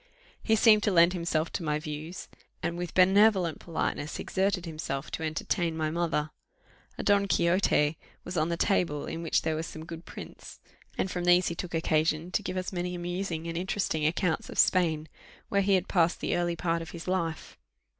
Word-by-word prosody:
He 220 - +2
seemed 215 -1 +6
to 205 - +1
lend 170 0 +5
himself 170 -2 -1
to - - -3
my 150 -1 0
views, 155 +3 -6 0.4
and 170 +1 -1
with 175 -1 -5
benevolent 190 -2 +4
politeness 160 -2 -3
exerted 190 -2 -1
himself 155 -3 -5
to - - -4
entertain 160 +1 -1
my 155 -1 -1
mother. 160 -2 -1 0.7
A - - -4
Don 200 -1 +3
Quixote 170 -4 +2 0.2
was 180 - -6
on 155 0 +1
the 170 - -1
table, 165 -7 +1
in 165 - -5
which 165 - +1
there 160 - 0
were 155 - -2
some 160 -1 -8
good 165 0 -8
prints, - - -10 0.4
and 190 - -1
from 175 -1 -3
these 175 +1 +5
he 170 - -4
took 175 0 -5
occasion 160 +1 +1
to - - +1
give 185 - -4
us 185 +1 -3
many 180 0 -2
amusing 175 -1 -3
and 165 0 -4
interesting 180 -3 -1
accounts 160 0 -1
of - - -8
Spain, 160 -4 +3 0.4
where 200 - +2
he 195 0 +3
had 185 0 0
passed 175 -2 +2
the - - -1
early 175 -1 0
part 170 0 -1
of 165 - -7
his 170 0 -9
life. 170 -4 -2
170 Hz, 195 wpm, -28 LUFS, 160-185 Hz, 0.7 s, seemed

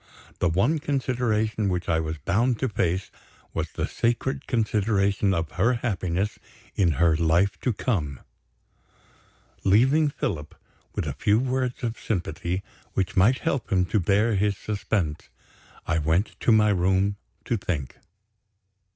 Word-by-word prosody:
The 85 - +2
one 100 - +2
consideration 120 -7 0
which 90 -1 -2
I 80 -1 +2
was 80 0 -3
bound 115 - +1
to 130 - 0
face, 95 -2 -1 0.4
was - - -2
the - - -1
sacred 130 +4 -1
consideration 105 -4 +1
of 85 -4 -1
her 115 +7 +2
happiness 100 -4 -2 0.3
in 85 -5 +2
her 85 +1 +3
life 85 +5 +2
to 125 - 0
come. 85 - -2 1.4
Leaving 130 +10 +4
Philip, 75 - -4 0.4
with - - -1
a - - -2
few 105 +1 +2
words 130 +1 -1
of 115 -1 -2
sympathy 90 -1 -2 0.3
which 95 -1 -1
might 105 +8 +5
help 140 - -1
him 90 -2 +3
to 110 - +4
bear 100 +5 +2
his 100 0 +1
suspense, 100 - -2 0.6
I 85 -1 +1
went 80 +7 +1
to - - +2
my 105 -1 +5
room 95 +1 +2 0.3
to 120 - 0
think. 80 - -4
100 Hz, 140 wpm, -25 LUFS, 90-115 Hz, 1.4 s, might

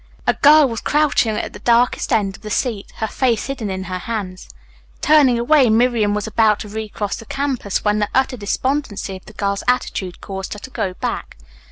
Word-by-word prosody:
A - - +3
girl 300 0 +6
was 230 -3 -4
crouching 290 -7 +2
at - - -4
the - - -10
darkest 240 +1 +2
end 195 -3 +1
of - - -16
the 215 - -7
seat, 215 -2 -2
her 220 - -2
face 235 -1 0
hidden 270 -6 -4
in 190 0 -3
her 185 -1 -4
hands. 195 -4 -5 0.5
Turning 285 -5 +5
away, 255 +1 +4
Miriam 220 -2 +2
was 210 - -2
about 220 -1 +2
to 210 - -7
recross 210 -1 -4
the 225 - -10
campus 265 -9 -2
when 210 0 +2
the 210 - 0
utter 265 0 +1
despondency 225 -2 -2
of 185 - -18
the 215 - -12
girl's 200 -1 -2
attitude 200 -7 -1
caused 190 -1 -6
her 210 - -8
to 260 - -10
go 185 -6 -3
back. - - -4
220 Hz, 200 wpm, -19 LUFS, 205-255 Hz, 0.5 s, girl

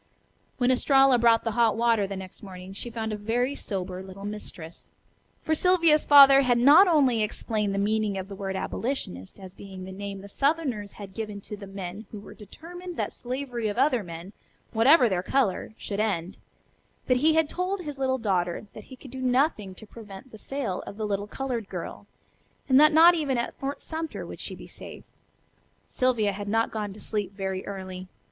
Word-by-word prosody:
When 250 0 +3
Estralla 270 0 +4
brought 230 -1 +4
the 225 - -1
hot 225 -1 +2
water 230 -3 +2
the 195 - -5
next 190 -1 -9
morning 185 -1 -10
she 220 +4 -5
found 220 -2 -4
a - - -1
very 235 +6 -1
sober 185 -7 -4
little 190 +1 -10
mistress. 180 -5 -8 0.5
For 315 - 0
Sylvia's 335 -2 +3
father 275 -1 +9
had 250 -3 +2
not 290 +11 +7
only 270 -9 +3
explained 210 -1 -1
the - - -2
meaning 210 0 0
of 190 0 -5
the 200 - -9
word 195 -1 -4
"abolitionist" 190 - -4
as 190 -2 -10
being 195 -2 -10
the 190 - -8
name 200 0 -6
the 200 - -10
southerners 270 -5 -1
had 200 -2 -10
given 215 -2 -5
to 210 - -8
the 200 -1 -10
men 195 +2 -7
who 210 - -8
were 205 - -12
determined 350 - -10
that - - -2
slavery 250 -2 -4
of 205 +1 -3
other 260 -2 +3
men, 170 +3 -9 0.4
whatever 250 +4 +5
their 185 -4 0
color, 220 -1 0
should 200 -1 -5
end, 190 -4 -1 0.7
but 255 - +3
he 310 +4 +3
had 320 -1 +3
told 365 +4 -3
his 295 -5 -7
little 260 -1 +1
daughter 185 -5 -1
that 215 - -11
he 260 - -12
could 255 0 -13
do 260 0 -7
nothing 250 - +1
to 220 - -12
prevent 215 +2 -12
the 220 - -12
sale 260 -9 -4
of 200 - -8
the 215 - -2
little 205 0 -2
colored 240 -3 -4
girl, - - -7 0.6
and 260 -1 +6
that 305 +1 +7
not 330 +3 +8
even 290 -6 -1
at 235 - -2
Fort 275 +1 -5
Sumter 320 0 -5
would - - -9
she - - -5
be - - -11
safe. - - -11 0.9
Sylvia 240 -5 +1
had 200 +1 -6
not 225 +2 +1
gone 210 -2 -4
to 205 - -11
sleep 205 -3 -3
very 190 -1 -4
early. 185 -2 -7
220 Hz, 195 wpm, -26 LUFS, 195-270 Hz, 0.9 s, father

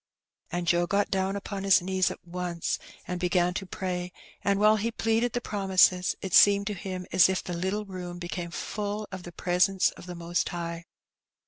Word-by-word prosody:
And 175 0 -2
Joe 175 0 +2
got 200 +2 +1
down 190 0 0
upon 200 0 -5
his 195 -1 +6
knees 185 0 +1
at - - -10
once 175 -1 -3 0.3
and 180 0 -3
began 180 0 +2
to 190 +1 -4
pray, 180 -1 -3 0.3
and 200 0 +2
while 215 +1 +5
he 220 +3 -1
pleaded 225 +1 0
the 245 - -1
promises, 190 -4 +3
it 190 -2 -4
seemed 200 0 +7
to 210 - -2
him 185 -1 -5
as 185 0 +6
if 190 -1 -1
the 180 - -5
little 190 +5 -2
room 180 -2 -7
became 175 0 -5
full 210 +4 -4
of 185 -1 -6
the 175 - -9
presence 180 +2 +2
of - - -13
the 180 - -6
Most 170 +1 -1
High. 170 -1 -5
185 Hz, 195 wpm, -28 LUFS, 175-200 Hz, 0.3 s, seemed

